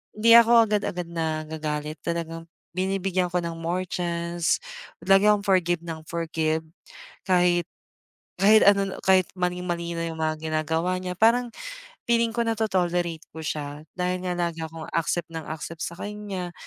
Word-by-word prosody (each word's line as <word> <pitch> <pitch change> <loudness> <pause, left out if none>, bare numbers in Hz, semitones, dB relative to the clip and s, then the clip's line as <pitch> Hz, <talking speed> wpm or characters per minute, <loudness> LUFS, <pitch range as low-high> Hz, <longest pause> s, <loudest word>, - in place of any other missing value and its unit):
hindi 230 +2 +4
ako 235 0 +7
agad-agad 200 -4 -1
nagagalit, 155 -2 -3
talagang 165 -1 -4 0.3
binibigyan 185 -1 0
ko 180 - +1
ng 170 0 -3
more 175 +3 -2
chance, 170 -1 -1 0.5
lagi 195 +2 +5
akong 205 -1 +2
forgive 175 -3 +2
ng 160 -1 -6
forgive 160 -1 -1 0.7
kahit 175 -2 +3 0.7
kahit 215 +2 +6
ano, 195 -1 +1
kahit 190 -1 +4
maling-mali 175 -1 -2
na 165 0 -2
yung 160 - -6
mga 155 0 0
ginagawa 160 +3 0
niya. 180 -1 -5
Parang 235 +3 +4 0.6
feeling 230 -1 +3
ko 235 - +2
nato-tolerate 180 -7 0
ko 160 - -8
siya, 150 -1 -4
dahil 180 0 -1
nga 180 -1 -1
lagi 170 -2 -2
akong 160 0 -8
accept 170 +1 -1
ng 160 -1 -5
accept 160 +1 -6
sa 170 - -6
kanya, 205 -4 -5
175 Hz, 145 wpm, -25 LUFS, 165-190 Hz, 0.7 s, ako